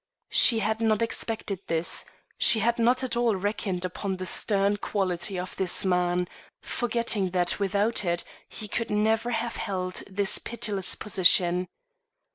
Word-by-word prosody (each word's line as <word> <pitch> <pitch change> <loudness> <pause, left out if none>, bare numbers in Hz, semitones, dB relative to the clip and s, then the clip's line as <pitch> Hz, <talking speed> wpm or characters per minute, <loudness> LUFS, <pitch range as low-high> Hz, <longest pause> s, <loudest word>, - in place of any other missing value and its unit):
She 235 - +6
had 220 +1 -2
not 220 -1 +1
expected 225 -4 -3
this; 165 +1 0 0.3
she - - +6
had 235 +2 0
not 245 +3 +2
at 255 -2 -2
all 235 -3 +1
reckoned 195 -2 -3
upon 190 +2 -4
the 185 - -6
stern 200 +2 +1
quality 190 -2 -2
in 180 - -3
this 190 0 +3
man, 180 -1 0 0.3
forgetting 230 -5 -1
that 175 +2 +1
without 205 +3 +1
it 175 -1 +1 0.3
he 215 - -6
could 230 +2 -3
never 220 +3 0
have 235 0 -3
held 185 -2 -4
his 195 0 +2
pitiless 215 -5 0
position. 180 -2 +3
205 Hz, 145 wpm, -26 LUFS, 185-225 Hz, 0.3 s, She